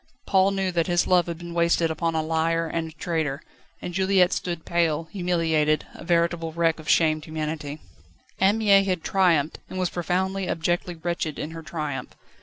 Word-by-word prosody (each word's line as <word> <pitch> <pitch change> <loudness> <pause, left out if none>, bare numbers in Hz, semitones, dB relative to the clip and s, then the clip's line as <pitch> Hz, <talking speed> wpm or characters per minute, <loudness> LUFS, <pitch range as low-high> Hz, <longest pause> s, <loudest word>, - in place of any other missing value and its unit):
Paul 190 0 +4
knew 195 -1 -1
that 170 -1 0
his 175 -1 +2
love 180 -1 +3
had 170 -1 -4
been 170 0 -8
wasted 170 -1 +2
upon 165 0 -1
a 160 - +1
liar 165 +1 0
and 165 0 -3
a - - -12
traitor, 155 -3 -2 0.4
and 175 - -5
Juliette 190 -1 +3
stood 170 -2 -3
pale, 165 -2 +1
humiliated, 165 -5 +1
a - - -11
veritable 170 -1 +1
wreck 165 0 +1
of 155 - -8
shamed 155 -2 +3
humanity. 155 -2 -4 0.6
Anne 195 +3 +4
Mie 200 -3 +5
had 185 -4 -1
triumphed, 170 -6 +2
and 185 - -6
was 185 -2 0
profoundly, 185 +2 -1
abjectly 175 +2 -1
wretched 165 -2 -3
in 150 - -4
her 165 0 -7
triumph. 150 -4 -5
170 Hz, 180 wpm, -25 LUFS, 160-180 Hz, 0.6 s, Mie